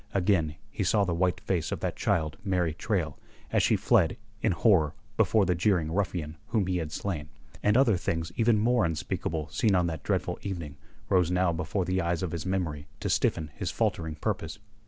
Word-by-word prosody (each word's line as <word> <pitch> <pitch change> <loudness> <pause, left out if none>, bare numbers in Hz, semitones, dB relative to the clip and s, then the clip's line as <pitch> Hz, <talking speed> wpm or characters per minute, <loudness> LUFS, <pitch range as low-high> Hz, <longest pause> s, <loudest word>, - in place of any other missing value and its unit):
Again 90 -5 +2 0.2
he 100 - -2
saw 100 +3 +3
the 90 - -1
white 90 +1 +1
face 85 -5 -1
of - - -2
that - - -2
child 80 -3 0
Mary 90 -5 +1
Traill 85 -6 -2 0.3
as - - +3
she - - +3
fled 95 +6 +3 0.2
in - - +2
horror 85 -4 +3 0.2
before 110 -3 +3
the 90 - +2
jeering 85 -3 +1
ruffian 85 -4 -2
whom 110 -4 +1
he 90 0 0
had 80 -3 -3
slain, 75 -4 -3 0.3
and 105 +3 +3
other 120 -8 +4
things 80 -1 -2
even 115 -1 +3
more 115 +2 +3
unspeakable 80 -1 -2
seen 105 +5 +2
on 90 -1 +3
that 80 -3 -3
dreadful - - -1
evening 85 -7 -5 0.3
rose 90 -4 +3
now 90 -1 +2
before 90 +3 -1
the 95 +1 0
eyes 85 +1 -1
of 90 - -2
his 85 +1 -4
memory 80 -6 -2
to - - -1
stiffen 80 -2 +1
his - - -3
faltering 80 -2 -1
purpose. 80 +1 -3
90 Hz, 195 wpm, -28 LUFS, 80-95 Hz, 0.3 s, other